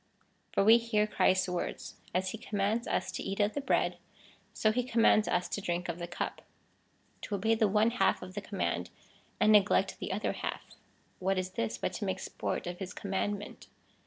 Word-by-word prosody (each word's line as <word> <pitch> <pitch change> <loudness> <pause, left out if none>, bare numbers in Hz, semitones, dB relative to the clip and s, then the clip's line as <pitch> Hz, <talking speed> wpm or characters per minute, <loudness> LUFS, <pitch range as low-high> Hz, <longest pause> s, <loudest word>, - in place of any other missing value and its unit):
^ - - -44
For - - +4
we 225 +3 +8
hear 225 -2 +1
Christ's 190 -3 +2
words. 180 -1 -4 0.2
As 185 +1 0
he 220 - -6
commands 210 +3 -1
us - - -1
to - - -4
eat 195 - -4
of 205 +1 +2
the 285 - -2
bread, - - +1 0.5
so 215 - +2
he 245 +3 +1
commands 230 -3 +4
us 180 0 +1
to 205 - -3
drink 175 -2 -2
of 170 +1 -3
the 175 - -4
cup. 175 - -4 0.8
To 205 - -3
obey 220 +3 +2
the 220 -1 +3
one 215 +3 +3
half 245 - +2
of 185 0 -9
the 205 - -4
command 200 -1 -2 0.5
and 215 0 +5
neglect 210 -1 +4
the - - -4
other - - -1
half - - -5 0.2
— - - -37
what 190 +1 +1
is 185 0 -2
this 115 -9 -2
but - - -2
to 210 - -3
make 190 -1 -1
sport - - -4
of 175 0 -5
his 185 -2 -6
command 200 +1 -1
ment 205 - -10
200 Hz, 210 wpm, -31 LUFS, 185-215 Hz, 0.8 s, we